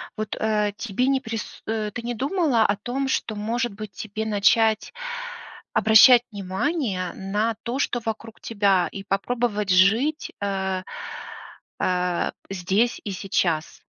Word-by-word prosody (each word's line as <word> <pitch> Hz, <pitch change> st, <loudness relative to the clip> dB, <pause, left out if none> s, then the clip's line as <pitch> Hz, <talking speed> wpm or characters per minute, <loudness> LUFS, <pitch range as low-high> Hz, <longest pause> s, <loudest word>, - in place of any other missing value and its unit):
Вот, 215 Hz, -1 st, -4 dB
э, 210 Hz, -1 st, +1 dB
тебе 240 Hz, +3 st, -1 dB
не 270 Hz, -1 st, +3 dB
прис 225 Hz, -4 st, -6 dB
э, 215 Hz, -1 st, -1 dB
ты 240 Hz, -, -4 dB
не 240 Hz, +1 st, -3 dB
думала 275 Hz, -, +2 dB
о 205 Hz, -, +2 dB
том, 260 Hz, +6 st, -2 dB
что, 220 Hz, -, -1 dB
может 230 Hz, +2 st, -1 dB
быть, 215 Hz, 0 st, -8 dB
тебе 215 Hz, +2 st, -5 dB
начать 220 Hz, -, +3 dB, 0.8 s
обращать 225 Hz, +3 st, +7 dB
внимание 200 Hz, -, -2 dB
на 210 Hz, +3 st, -1 dB
то, 250 Hz, +3 st, -2 dB
что 245 Hz, -, +1 dB
вокруг 225 Hz, 0 st, -5 dB
тебя, 200 Hz, -5 st, +2 dB
и 195 Hz, -, -6 dB
попробовать 210 Hz, +1 st, -1 dB
жить, 220 Hz, -, +3 dB
э, 190 Hz, -2 st, -1 dB, 1.0 s
э, 180 Hz, -1 st, +1 dB, 0.2 s
здесь 195 Hz, +5 st, 0 dB
и 205 Hz, -, -4 dB
сейчас? 185 Hz, -4 st, -1 dB
215 Hz, 135 wpm, -24 LUFS, 195-235 Hz, 1.0 s, обращать